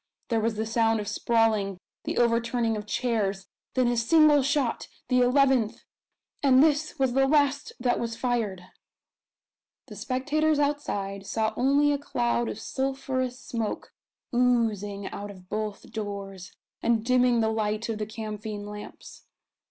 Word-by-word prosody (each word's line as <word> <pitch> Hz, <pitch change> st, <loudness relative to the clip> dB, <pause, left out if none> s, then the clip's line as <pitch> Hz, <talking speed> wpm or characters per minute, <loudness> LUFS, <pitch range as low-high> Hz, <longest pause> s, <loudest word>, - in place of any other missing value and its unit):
There 230 Hz, -2 st, +2 dB
was 225 Hz, 0 st, 0 dB
the 220 Hz, +1 st, -2 dB
sound 225 Hz, 0 st, +2 dB
of 205 Hz, -, -5 dB
sprawling 215 Hz, -2 st, +1 dB, 0.3 s
the -, -, -3 dB
overturning 235 Hz, -1 st, +1 dB
of 210 Hz, 0 st, -6 dB
chairs 210 Hz, -4 st, -1 dB, 0.3 s
then 255 Hz, -2 st, +3 dB
a 240 Hz, -, +1 dB
single 295 Hz, +5 st, +5 dB
shot 275 Hz, -2 st, 0 dB, 0.2 s
the 250 Hz, -1 st, +4 dB
eleventh 250 Hz, -3 st, +3 dB, 0.6 s
and 270 Hz, -1 st, +6 dB
this 305 Hz, 0 st, +1 dB
was 265 Hz, -2 st, +1 dB
the 270 Hz, +1 st, +3 dB
last 285 Hz, -1 st, +2 dB
that 245 Hz, 0 st, +1 dB
was 230 Hz, -1 st, -3 dB
fired! 225 Hz, -8 st, -2 dB, 1.2 s
The -, -, -11 dB
spectators 300 Hz, +4 st, 0 dB
outside 205 Hz, -10 st, -2 dB
saw 220 Hz, +1 st, 0 dB
only 280 Hz, +3 st, +3 dB
a 285 Hz, -, 0 dB
cloud 240 Hz, -4 st, -1 dB
of 210 Hz, -, -6 dB
sulphurous 265 Hz, 0 st, -2 dB
smoke 230 Hz, -4 st, -4 dB, 0.4 s
oozing 220 Hz, -5 st, +1 dB
out 205 Hz, 0 st, -6 dB
of 185 Hz, -2 st, -13 dB
both 215 Hz, -1 st, -4 dB
doors, 200 Hz, -3 st, -6 dB, 0.3 s
and 230 Hz, -1 st, +1 dB
dimming 250 Hz, -1 st, +3 dB
the 220 Hz, -, +2 dB
light 215 Hz, 0 st, -1 dB
of 225 Hz, -2 st, -3 dB
the 210 Hz, -, -3 dB
camphine 215 Hz, -1 st, -6 dB
lamps. 210 Hz, 0 st, -10 dB
230 Hz, 145 wpm, -27 LUFS, 210-260 Hz, 1.2 s, and